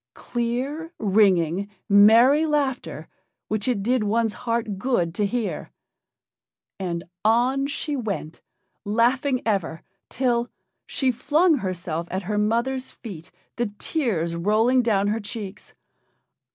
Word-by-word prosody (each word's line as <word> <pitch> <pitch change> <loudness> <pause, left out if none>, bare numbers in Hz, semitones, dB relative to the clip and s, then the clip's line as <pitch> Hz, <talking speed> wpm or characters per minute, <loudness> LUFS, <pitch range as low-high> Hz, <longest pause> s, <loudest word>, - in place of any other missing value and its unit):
Clear, 255 +7 -3
ringing, 195 -3 +2 0.2
merry 230 +9 +6
laughter, 285 -4 -2 0.4
which 215 0 -1
it 230 -6 0
did 245 +1 +1
one's 220 +1 +1 0.2
heart 225 -4 -1
good 190 -8 0
to 205 +2 0
hear. 235 0 -3 1.1
And 170 -3 -3 0.2
on 250 +5 +2
she 290 +1 -3
went, 200 - -4 0.4
laughing 250 +5 +1
ever, 190 -7 -1 0.3
till 240 -2 0 0.4
she 265 -2 +1
flung 300 +7 +2
herself 175 - -3
at 190 +2 -3
her 210 +3 -1
mother's 240 +5 0
feet, 185 -7 -10 0.3
the 240 -1 0
tears 195 - -1
rolling 220 +8 +3
down 205 -4 +1
her 220 +2 0
cheeks. 205 -2 -8
225 Hz, 115 wpm, -24 LUFS, 195-255 Hz, 1.1 s, merry